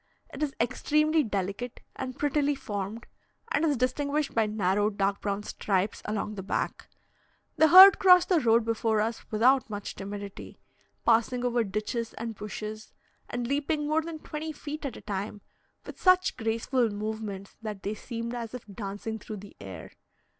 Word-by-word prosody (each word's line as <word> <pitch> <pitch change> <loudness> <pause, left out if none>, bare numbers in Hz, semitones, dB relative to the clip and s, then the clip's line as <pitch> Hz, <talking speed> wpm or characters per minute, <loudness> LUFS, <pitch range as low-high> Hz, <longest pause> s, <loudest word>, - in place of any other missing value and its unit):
It 275 - -7
is 290 -3 -1
extremely 305 +6 +2
delicate 205 +1 -3 0.2
and 260 0 -5
prettily 290 0 +1
formed, 205 -1 -5 0.5
and 330 - +1
is 295 -4 +2
distinguished 285 +4 0
by 225 -2 +2
narrow 205 0 +1
dark 200 -1 -1
brown 200 0 -2
stripes 200 -1 -1
along 210 0 -2
the 200 - -5
back. 195 - -3 0.7
The 315 +1 +6
herd 375 +4 +10
crossed 360 -2 +6
the 360 -3 +4
road 230 -3 +3
before 225 -1 +1
us 225 +2 -1
without 250 +4 +3
much 205 -1 -5
timidity, 200 0 -7 0.5
passing 240 +2 +3
over 240 -1 +2
ditches 215 +3 -3
and 230 0 -4
bushes, 215 +1 -7 0.4
and 245 0 -3
leaping 295 +3 0
more 310 +1 +2
than 325 0 -6
twenty 310 +1 -5
feet 300 0 -6
at 255 - -7
a - - -11
time, 205 0 -4 0.4
with - - -10
such 370 0 +4
graceful 230 +1 0
movements 210 -2 -5
that 210 -3 -6
they 205 - -2
seemed 230 +2 -5
as 235 -1 -5
if 250 - -8
dancing 205 +2 -5
through 215 0 -7
the 200 0 -12
air. 95 -4 -9
230 Hz, 160 wpm, -28 LUFS, 210-280 Hz, 0.7 s, herd